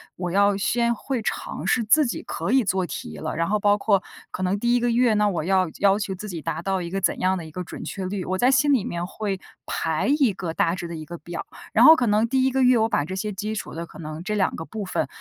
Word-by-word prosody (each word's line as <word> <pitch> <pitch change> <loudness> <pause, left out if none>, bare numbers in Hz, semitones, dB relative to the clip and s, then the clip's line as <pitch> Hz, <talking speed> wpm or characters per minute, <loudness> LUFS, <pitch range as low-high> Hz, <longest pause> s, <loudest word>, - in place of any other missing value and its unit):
我 180 -1 -4
要 200 +2 +3
先 235 +4 +1
会 255 +2 -3
尝 - - -4
试 250 - +2
自 290 +8 +4
己 235 - -4
可 165 +6 -3
以 265 -1 +5
做 190 -2 0
题 80 - -7
了， - - -4
然 165 +1 0
后 210 +1 +1
包 205 0 +3
括 200 -2 +2 0.3
可 - - -5
能 185 +2 +1
第 240 +3 +1
1 245 - +4
个 240 0 +1
月 235 -1 +3
呢， 210 0 +3
我 175 -5 -2
要 185 +1 +2
要 200 0 +4
求 195 -2 -3
自 210 +3 -8
己 170 -4 -5
达 155 +2 -3
到 190 +1 -1
一 170 - -5
个 195 +2 -3
怎 - - +1
样 185 +1 +1
的 175 - -6
一 160 - -11
个 180 - -5
准 - - -8
确 190 - -5
率， 190 0 -3
我 185 +1 -2
在 245 +6 +4
心 290 +2 +3
里 255 -8 +3
面 175 0 -3
会 195 0 -4 0.3
排 160 -1 -1
一 265 -6 +4
个 170 -3 -5
大 165 +1 +1
致 175 -2 -5
的 170 - -6
一 155 -1 -7
个 170 +2 -8
表， 170 +2 -7 0.3
然 - - +5
后 320 - +10
可 255 - 0
能 210 +2 +3
第 260 +2 +1
1 265 - +2
个 265 +1 +1
月， 250 -1 +5
我 220 0 +3
把 145 - +1
这 185 +4 -5
些 210 +2 -3
基 210 +3 -4
础 215 - -5
的 170 +1 -5
可 - - -14
能 155 0 -6
这 210 +3 -2
2 195 -3 +1
个 - - -5
部 215 +1 -6
分 170 -5 -1
195 Hz, 300 characters per minute, -24 LUFS, 175-220 Hz, 0.3 s, 后